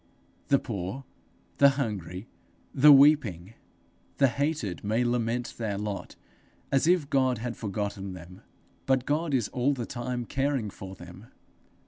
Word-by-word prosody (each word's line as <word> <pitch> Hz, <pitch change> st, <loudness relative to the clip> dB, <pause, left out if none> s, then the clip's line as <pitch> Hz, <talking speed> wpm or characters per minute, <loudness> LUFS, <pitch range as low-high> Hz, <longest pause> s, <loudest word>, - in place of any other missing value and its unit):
The 140 Hz, -, +4 dB
poor, 110 Hz, +1 st, -5 dB, 0.6 s
the 140 Hz, -, +8 dB
hungry, 100 Hz, -, -4 dB, 0.5 s
the 150 Hz, +3 st, +7 dB
weeping, 135 Hz, -, +4 dB, 0.6 s
the 135 Hz, -2 st, +4 dB
hated, 140 Hz, -, -2 dB
may 110 Hz, +4 st, +1 dB
lament 120 Hz, 0 st, -1 dB
their 105 Hz, -4 st, -2 dB
lot 105 Hz, -1 st, -5 dB, 0.6 s
as 135 Hz, +3 st, +2 dB
if 175 Hz, -4 st, +3 dB
God 130 Hz, -2 st, +2 dB
had 120 Hz, +1 st, -4 dB
forgotten 100 Hz, -2 st, -4 dB
them; 90 Hz, +1 st, -12 dB, 0.5 s
but 130 Hz, -1 st, +2 dB
God 155 Hz, +2 st, 0 dB
is 120 Hz, -6 st, +1 dB
all 130 Hz, +3 st, +1 dB
the 120 Hz, -3 st, -4 dB
time 120 Hz, 0 st, -4 dB
caring 135 Hz, -6 st, -1 dB
for 95 Hz, 0 st, -9 dB
them. 90 Hz, +5 st, -12 dB
120 Hz, 135 wpm, -27 LUFS, 100-135 Hz, 0.6 s, the